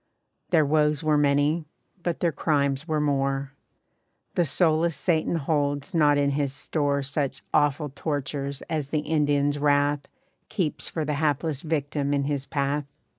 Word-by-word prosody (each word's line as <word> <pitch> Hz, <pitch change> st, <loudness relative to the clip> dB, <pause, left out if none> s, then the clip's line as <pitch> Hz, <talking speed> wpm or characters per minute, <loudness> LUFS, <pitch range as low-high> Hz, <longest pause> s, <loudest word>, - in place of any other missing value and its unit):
Their 160 Hz, -4 st, +4 dB
woes 150 Hz, +1 st, +2 dB
were 155 Hz, -1 st, +3 dB
many, 145 Hz, +2 st, +2 dB, 0.3 s
but 175 Hz, -1 st, -2 dB
their 170 Hz, -, +2 dB
crimes 140 Hz, -1 st, 0 dB
were 155 Hz, -2 st, 0 dB
more. 135 Hz, -2 st, 0 dB, 0.8 s
The 175 Hz, -, +2 dB
soulless 160 Hz, +2 st, +2 dB
Satan 170 Hz, -1 st, +1 dB
holds 145 Hz, +1 st, -1 dB
not 150 Hz, -3 st, +4 dB
in 140 Hz, 0 st, +2 dB
his 140 Hz, -1 st, -1 dB
store 145 Hz, -1 st, -1 dB
Such 140 Hz, 0 st, -2 dB
awful 145 Hz, 0 st, +2 dB
tortures 140 Hz, -1 st, -3 dB
as 150 Hz, -4 st, -3 dB
the 155 Hz, 0 st, 0 dB
Indians' 145 Hz, -2 st, +1 dB
wrath 145 Hz, 0 st, +2 dB, 0.4 s
Keeps 180 Hz, -8 st, -2 dB
for 160 Hz, -2 st, -2 dB
the 150 Hz, -, -1 dB
hapless 150 Hz, -1 st, 0 dB
victim 145 Hz, -2 st, -1 dB
in 140 Hz, -, +1 dB
his 140 Hz, -1 st, -2 dB
path. 140 Hz, 0 st, -1 dB
145 Hz, 145 wpm, -26 LUFS, 140-155 Hz, 0.8 s, Their